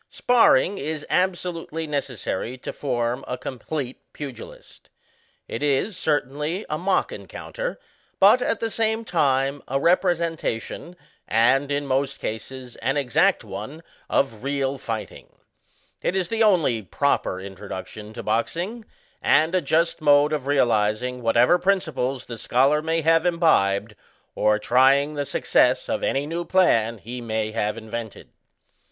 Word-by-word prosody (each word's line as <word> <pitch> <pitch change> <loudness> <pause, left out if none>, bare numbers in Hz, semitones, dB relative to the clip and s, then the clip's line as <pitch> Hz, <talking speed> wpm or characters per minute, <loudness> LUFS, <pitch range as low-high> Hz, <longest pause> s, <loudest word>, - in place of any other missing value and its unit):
Sparring 205 - +3
is 150 +1 -4
absolutely 175 -3 -1
necessary 130 -5 -3
to - - -7
form 120 -2 -2
a 125 - -3
com 125 0 -7
plete 135 -2 -4 0.2
pugilist. 140 -5 -10 0.6
It 115 - -5
is, 145 +8 +1
certainly, 150 +3 -1
a 150 - 0
mock 185 +1 +1
encounter; - - -6 0.4
but, 210 +6 +6
at 230 - 0
the 225 -1 -2
same 225 +1 -1
time, 140 -5 +1
a 135 +1 0
representation, 170 - 0 0.3
and, 135 +6 +3
in 145 0 -1
most 135 +1 0
cases, 125 +3 -6
an 135 +2 -1
exact 130 -5 +2
one, 110 +12 -8 0.3
of 115 -6 0
real 140 0 -1
fighting. 115 -3 -6 0.7
It 185 - -1
is 185 -3 0
the 225 0 -1
only 165 - +3
proper 105 -3 0
introduction 100 +2 -8
to - - -7
boxing, 175 - -2 0.4
and 160 +4 +3
a 185 - +2
just 165 +3 +1
mode 145 0 +4
of 140 -3 -3
realizing 125 -2 +1
whatever 120 +9 +4
prinpiples 155 -9 0
the 115 -2 -8
scholar 135 +6 +2
may 165 +1 0
have 165 +1 +4
imbibed, 115 - +2 0.4
or 105 0 +2
trying 135 +6 +3
the 145 -1 -2
success - - +2
of - - -2
any 135 +1 0
new 165 +3 -3
plan 115 -12 +2
he 120 +4 -7
may 110 -2 -2
have 105 -1 -1
invented. 115 -1 -7
140 Hz, 135 wpm, -24 LUFS, 120-165 Hz, 0.7 s, but